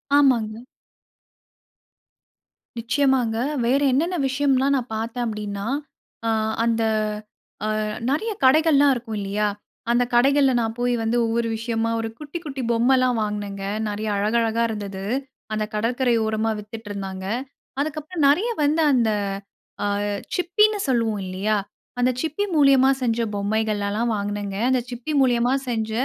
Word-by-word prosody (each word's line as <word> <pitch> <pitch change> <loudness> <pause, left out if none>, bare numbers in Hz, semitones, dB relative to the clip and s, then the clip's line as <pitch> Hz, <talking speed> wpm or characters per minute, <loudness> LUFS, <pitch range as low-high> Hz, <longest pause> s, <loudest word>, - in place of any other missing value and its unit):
ஆமாங்க. 235 -7 +3 2.2
நிச்சயமாங்க. 245 -1 +1 0.3
வேறு 275 +4 +2
என்னென்ன 335 +8 +1
விஷயம்லாம் 275 0 +2
நான் 245 -2 -5
பார்த்தேன் 230 +2 -3
அப்டீன்னா, 210 -1 -4 0.6
ஆ - - +2 0.3
அந்த 230 -1 +1 0.8
அ - - 0 0.4
நெறைய 435 +11 0
கடைகள்லாம் 290 0 +5
இருக்கும், 230 -3 -5
இல்லியா! 200 +1 -1 0.5
அந்த 240 +1 +3
கடைகள்ல, 270 +2 +4
நான் 225 -1 -1
போய் 245 0 +1
வந்து 230 +2 +1
ஒவ்வொரு 230 +1 0
விஷயமா, 225 0 -1
ஒரு 225 0 -2
குட்டி, 300 +2 -6
குட்டி 270 -3 -4
பொம்மல்லாம் 250 +1 +3
வாங்குனேங்க. 205 -2 -3 0.2
நெறைய 210 +1 -3
அழகழகா 225 +2 +1
இருந்தது. 200 -3 -5 0.5
அந்த 215 0 0
கடற்கரை 240 +3 +1
ஓரமா 220 +1 0
வித்துட்ருந்தாங்க. 205 -3 -7 0.6
அதுக்கப்புறம் 310 +1 -2
நெறைய 380 +12 +2
வந்து, 305 +3 +2
அந்த 235 -3 +3 0.8
அ - - +1 0.5
சிப்பின்னு 420 +4 +3
சொல்லுவோம், 225 -5 +1
இல்லியா! 200 +4 0 0.4
அந்த 250 +1 +3
சிப்பி 320 +6 -1
மூலியமா 270 -2 +6
செஞ்ச 235 -1 +1 0.2
பொம்மைகளெல்லாம் 215 +2 0
வாங்குனேங்க. 205 -1 -3
அந்த 255 - +2
சிப்பி 245 +5 -4
மூலியமா 245 0 +2 0.2
செஞ்ச, 220 -2 -1
235 Hz, 120 wpm, -23 LUFS, 215-270 Hz, 2.2 s, மூலியமா